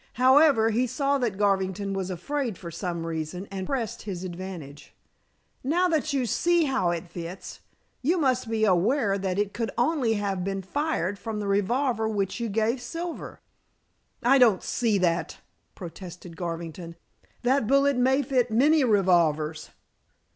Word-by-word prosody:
However, 260 Hz, -3 st, +5 dB
he 245 Hz, +4 st, +1 dB
saw 275 Hz, +3 st, 0 dB
that 230 Hz, -6 st, -1 dB
Garvington 195 Hz, -1 st, 0 dB
was 190 Hz, -1 st, -3 dB
afraid 235 Hz, +4 st, -3 dB
for 170 Hz, -2 st, -8 dB
some 170 Hz, 0 st, -4 dB
reason, 165 Hz, +3 st, -4 dB
and 190 Hz, -1 st, -4 dB
pressed 245 Hz, -6 st, -3 dB
his 190 Hz, -3 st, -6 dB
advantage. 175 Hz, -6 st, -8 dB, 0.7 s
"Now 340 Hz, +7 st, +2 dB
that 310 Hz, -2 st, 0 dB
you 270 Hz, -3 st, 0 dB
see 340 Hz, -, +2 dB
how 265 Hz, -, +1 dB
it 170 Hz, 0 st, -3 dB
fits, 170 Hz, +2 st, -8 dB, 0.4 s
you 330 Hz, +8 st, +2 dB
must 255 Hz, -6 st, +1 dB
be 220 Hz, -1 st, +1 dB
aware 200 Hz, +3 st, +2 dB
that 190 Hz, -1 st, -2 dB
it 205 Hz, -1 st, 0 dB
could 230 Hz, -1 st, -2 dB
only 245 Hz, -2 st, +2 dB
have 200 Hz, -3 st, -2 dB
been 195 Hz, 0 st, -3 dB
fired 205 Hz, -, -2 dB
from 225 Hz, -2 st, -4 dB
the 205 Hz, -, -3 dB
revolver 220 Hz, +3 st, +1 dB
which 200 Hz, 0 st, -2 dB
you 235 Hz, -1 st, -2 dB
gave 225 Hz, +4 st, 0 dB
Silver." 335 Hz, +7 st, -6 dB, 0.8 s
"I 265 Hz, +3 st, +5 dB
don't 225 Hz, -7 st, +5 dB
see 230 Hz, -4 st, +1 dB
that," 175 Hz, -2 st, 0 dB, 0.4 s
protested 175 Hz, -1 st, -9 dB
Garvington. 170 Hz, 0 st, -6 dB, 0.5 s
"That 255 Hz, -2 st, +2 dB
bullet 275 Hz, +2 st, +4 dB
may 260 Hz, +3 st, +3 dB
fit 250 Hz, -2 st, +1 dB
many 285 Hz, +7 st, +4 dB
revolvers." 170 Hz, -, +2 dB
210 Hz, 150 wpm, -26 LUFS, 185-260 Hz, 0.8 s, However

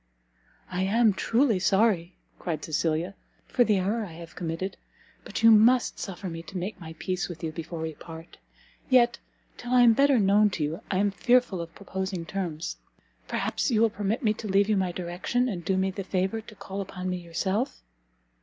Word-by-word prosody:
"I 180 Hz, 0 st, -1 dB
am 215 Hz, +3 st, +3 dB
truly 230 Hz, +1 st, +2 dB
sorry," 190 Hz, -2 st, +2 dB, 0.2 s
cried 160 Hz, -4 st, -3 dB
Cecilia, 160 Hz, +3 st, -1 dB, 0.3 s
"for 250 Hz, -, +3 dB
the 215 Hz, -4 st, +2 dB
error 205 Hz, +5 st, 0 dB
I 180 Hz, -6 st, -8 dB
have 165 Hz, 0 st, -11 dB
committed, 175 Hz, +3 st, -3 dB, 0.5 s
but -, -, -5 dB
you 225 Hz, -, +9 dB
must 230 Hz, +3 st, +5 dB
suffer 190 Hz, 0 st, -5 dB
me 165 Hz, -1 st, -5 dB
to 185 Hz, +3 st, -8 dB
make 185 Hz, +2 st, -5 dB
my 160 Hz, -1 st, -8 dB
peace 185 Hz, +2 st, -2 dB
with 170 Hz, -2 st, -8 dB
you 160 Hz, -, -2 dB
before 165 Hz, +1 st, -6 dB
we 160 Hz, 0 st, -3 dB
part: 165 Hz, +2 st, -11 dB, 0.5 s
yet, 240 Hz, -2 st, +4 dB, 0.4 s
till 245 Hz, -, -7 dB
I 250 Hz, -, +6 dB
am 235 Hz, -1 st, +7 dB
better 275 Hz, +2 st, +4 dB
known 205 Hz, +1 st, +4 dB
to 155 Hz, -, -1 dB
you, 155 Hz, +3 st, -3 dB
I 185 Hz, -, 0 dB
am 200 Hz, +1 st, +2 dB
fearful 245 Hz, -4 st, +2 dB
of 170 Hz, 0 st, -9 dB
proposing 190 Hz, -3 st, -4 dB
terms. 170 Hz, -2 st, -4 dB, 0.5 s
Perhaps -, -, -1 dB
you 225 Hz, -4 st, +2 dB
will 230 Hz, -1 st, +4 dB
permit 210 Hz, +5 st, -2 dB
me 215 Hz, -2 st, +3 dB
to 215 Hz, 0 st, -7 dB
leave 200 Hz, +1 st, +3 dB
you 215 Hz, -, +3 dB
my 190 Hz, -2 st, 0 dB
direction, 180 Hz, +8 st, -1 dB
and 185 Hz, -8 st, -4 dB
do 190 Hz, +3 st, 0 dB
me 190 Hz, 0 st, +1 dB
the 195 Hz, +1 st, -5 dB
favour 190 Hz, +4 st, -1 dB
to 215 Hz, -, -14 dB
call 195 Hz, 0 st, -6 dB
upon 185 Hz, -1 st, -6 dB
me 180 Hz, 0 st, -1 dB
yourself?" 190 Hz, -, -2 dB
190 Hz, 195 wpm, -27 LUFS, 175-220 Hz, 0.5 s, you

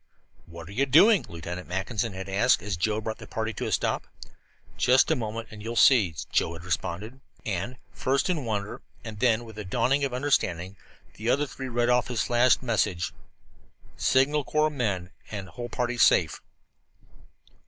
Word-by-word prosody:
"What 85 Hz, -1 st, -10 dB
are -, -, -10 dB
you 135 Hz, +7 st, 0 dB
doing?" 185 Hz, -, +6 dB
Lieutenant 85 Hz, +1 st, -7 dB
Mackinson 100 Hz, +4 st, -2 dB
had 95 Hz, 0 st, -6 dB
asked, 95 Hz, -2 st, +2 dB
as 105 Hz, -2 st, -2 dB
Joe 105 Hz, +5 st, 0 dB
brought 110 Hz, 0 st, -5 dB
the -, -, -10 dB
party 110 Hz, 0 st, -3 dB
to -, -, -4 dB
a -, -, -3 dB
stop. -, -, 0 dB, 0.7 s
"Just 130 Hz, +5 st, +4 dB
a -, -, +4 dB
moment 115 Hz, -2 st, -5 dB
and 105 Hz, -1 st, -10 dB
you 110 Hz, -, -6 dB
will 120 Hz, -, -4 dB
see," 110 Hz, -, +5 dB, 0.2 s
Joe 85 Hz, -, +1 dB
had 85 Hz, 0 st, -9 dB
responded. 100 Hz, -, -4 dB, 0.2 s
And, 100 Hz, +5 st, -3 dB, 0.2 s
first 135 Hz, +1 st, 0 dB
in 170 Hz, -6 st, -1 dB
wonder 105 Hz, -3 st, -3 dB, 0.2 s
and 110 Hz, -3 st, -8 dB
then 120 Hz, -1 st, +2 dB
with 110 Hz, -2 st, -10 dB
a -, -, -4 dB
dawning 125 Hz, +8 st, +1 dB
understanding, 125 Hz, -, 0 dB, 0.4 s
the 110 Hz, +3 st, -2 dB
other 140 Hz, +4 st, +2 dB
three 130 Hz, -1 st, -7 dB
read 120 Hz, 0 st, +1 dB
off 125 Hz, 0 st, +3 dB
his 120 Hz, -3 st, -1 dB
flashed 120 Hz, +1 st, +3 dB
message: 105 Hz, -7 st, 0 dB, 0.8 s
"Signal 140 Hz, +3 st, +2 dB
Corps 155 Hz, +2 st, +1 dB
men, 100 Hz, -10 st, -2 dB, 0.2 s
and 100 Hz, -3 st, -6 dB
whole 120 Hz, +4 st, -7 dB
party 120 Hz, +1 st, -2 dB
safe." 80 Hz, -7 st, +4 dB
110 Hz, 175 wpm, -27 LUFS, 95-125 Hz, 0.8 s, doing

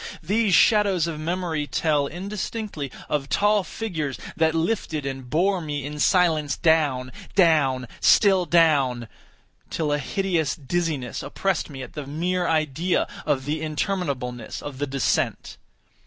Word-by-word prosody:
These 205 Hz, +2 st, +2 dB
shadows 200 Hz, -6 st, +4 dB
of 165 Hz, -2 st, -4 dB
memory 165 Hz, -2 st, -2 dB
tell, 150 Hz, -3 st, +1 dB
indistinctly, 195 Hz, -, -5 dB, 0.2 s
of 140 Hz, -2 st, -2 dB
tall 205 Hz, +5 st, +3 dB
figures 160 Hz, -11 st, -4 dB, 0.2 s
that 160 Hz, 0 st, +2 dB
lifted 160 Hz, -4 st, -1 dB
and 135 Hz, -2 st, -5 dB
bore 185 Hz, +6 st, +1 dB
me 145 Hz, -3 st, -4 dB
in 150 Hz, +1 st, -6 dB
silence 160 Hz, -5 st, +2 dB
down—down—still 155 Hz, -, +2 dB
down—till 150 Hz, -1 st, 0 dB
a 145 Hz, -, 0 dB
hideous 170 Hz, -1 st, -1 dB
dizziness 150 Hz, -4 st, -2 dB
oppressed 195 Hz, -4 st, -2 dB
me 135 Hz, -3 st, -7 dB
at -, -, -10 dB
the 150 Hz, -3 st, -6 dB
mere 175 Hz, +4 st, -1 dB
idea 160 Hz, +2 st, +1 dB, 0.2 s
of 130 Hz, -2 st, 0 dB
the 150 Hz, +2 st, -2 dB
interminableness 145 Hz, -7 st, -3 dB
of 140 Hz, -2 st, -7 dB
the 145 Hz, -, -1 dB
descent. 135 Hz, -1 st, -1 dB
155 Hz, 125 wpm, -24 LUFS, 140-180 Hz, 0.2 s, shadows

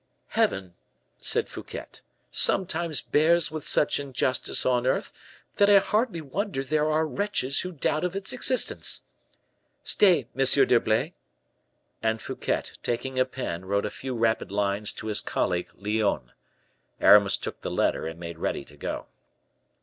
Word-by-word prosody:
"Heaven," 95 Hz, -2 st, 0 dB, 0.5 s
said -, -, 0 dB
Fouquet, -, -, -8 dB, 0.5 s
"sometimes 170 Hz, -4 st, +2 dB
bears 160 Hz, +1 st, +2 dB
with 155 Hz, -2 st, -5 dB
such 150 Hz, -, +3 dB
injustice 130 Hz, -2 st, -1 dB
on 125 Hz, -1 st, +2 dB
earth, -, -, 0 dB, 0.4 s
that 200 Hz, 0 st, +5 dB
I 205 Hz, -, +8 dB
hardly 210 Hz, -2 st, +1 dB
wonder 155 Hz, 0 st, -3 dB
there 150 Hz, +2 st, +1 dB
are 155 Hz, +1 st, +2 dB
wretches 155 Hz, -6 st, -1 dB
who 180 Hz, -, -3 dB
doubt 155 Hz, -1 st, -1 dB
of 180 Hz, +1 st, -2 dB
its 195 Hz, -1 st, -2 dB
existence. 255 Hz, 0 st, +1 dB, 0.8 s
Stay, 190 Hz, -5 st, +3 dB
M. 135 Hz, -, +2 dB
d'Herblay." 120 Hz, -5 st, +3 dB, 0.9 s
And 110 Hz, 0 st, 0 dB
Fouquet, -, -, -2 dB, 0.2 s
taking 130 Hz, +2 st, -2 dB
a 130 Hz, -, +4 dB
pen, 110 Hz, -9 st, -5 dB
wrote 100 Hz, +2 st, 0 dB
a 105 Hz, -, -3 dB
few 130 Hz, -1 st, -5 dB
rapid 115 Hz, -3 st, 0 dB
lines 100 Hz, +1 st, 0 dB
to -, -, -8 dB
his 105 Hz, -1 st, 0 dB
colleague 90 Hz, 0 st, -1 dB
Lyonne. 100 Hz, -, -1 dB, 0.7 s
Aramis 100 Hz, -1 st, +6 dB
took -, -, -7 dB
the -, -, -4 dB
letter -, -, 0 dB
and 80 Hz, +1 st, -7 dB
made 85 Hz, -1 st, -7 dB
ready -, -, -2 dB
to -, -, -16 dB
go. -, -, -4 dB
130 Hz, 145 wpm, -26 LUFS, 105-165 Hz, 0.9 s, I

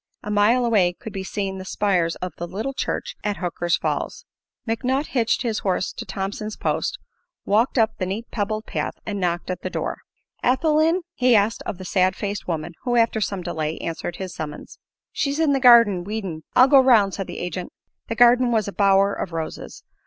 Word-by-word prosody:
A 210 Hz, -, -4 dB
mile 220 Hz, +4 st, +3 dB
away 195 Hz, -7 st, +3 dB
could 215 Hz, +4 st, -10 dB
be 195 Hz, -, -4 dB
seen 190 Hz, 0 st, -3 dB
the -, -, -6 dB
spires 185 Hz, -4 st, 0 dB
of 180 Hz, -3 st, -6 dB
the 175 Hz, -, -4 dB
little 220 Hz, +10 st, -4 dB
church -, -, -3 dB
at 205 Hz, -1 st, -1 dB
Hooker's 175 Hz, -1 st, -1 dB
Falls. 475 Hz, +1 st, -3 dB, 0.4 s
McNutt 255 Hz, +6 st, 0 dB
hitched 235 Hz, 0 st, +1 dB
his 225 Hz, -3 st, -1 dB
horse 185 Hz, -1 st, -1 dB
to -, -, -7 dB
Thompson's 195 Hz, +3 st, -4 dB
post, -, -, -1 dB, 0.5 s
walked 225 Hz, +6 st, +2 dB
up 225 Hz, -1 st, +4 dB
the 185 Hz, -, -1 dB
neat 210 Hz, +5 st, -4 dB
pebbled 215 Hz, 0 st, -2 dB
path -, -, -3 dB
and 205 Hz, -2 st, -3 dB
knocked 175 Hz, 0 st, -1 dB
at 180 Hz, -, -5 dB
the -, -, -3 dB
door. -, -, -3 dB, 0.4 s
"Ethel 300 Hz, +5 st, +2 dB
in?" 330 Hz, +3 st, +2 dB
he 250 Hz, -5 st, +3 dB
asked 210 Hz, +2 st, +2 dB
of -, -, -4 dB
the 185 Hz, -, -9 dB
sad 185 Hz, 0 st, +2 dB
faced 205 Hz, 0 st, -4 dB
woman 165 Hz, 0 st, -3 dB
who, 245 Hz, -2 st, -1 dB
after 230 Hz, -2 st, +2 dB
some 195 Hz, -3 st, -2 dB
delay, 160 Hz, -2 st, -3 dB
answered 165 Hz, +1 st, -4 dB
his 185 Hz, -2 st, -6 dB
summons. 150 Hz, -2 st, -7 dB, 0.3 s
"She's 280 Hz, +2 st, -1 dB
in 310 Hz, -3 st, +3 dB
the 270 Hz, -, +2 dB
garden, 230 Hz, -8 st, +6 dB
weedin'." 195 Hz, -5 st, -5 dB
"I'll 255 Hz, -, +7 dB
go 275 Hz, 0 st, +7 dB
'round," 220 Hz, -7 st, +4 dB
said 195 Hz, -, -4 dB
the -, -, -7 dB
agent. 180 Hz, 0 st, -5 dB, 0.4 s
The 230 Hz, -, -3 dB
garden 245 Hz, +1 st, +5 dB
was 220 Hz, -3 st, +1 dB
a 200 Hz, -, -5 dB
bower 195 Hz, 0 st, +4 dB
of 165 Hz, -, -5 dB
roses. 160 Hz, -1 st, -6 dB
205 Hz, 200 wpm, -23 LUFS, 185-235 Hz, 0.5 s, I'll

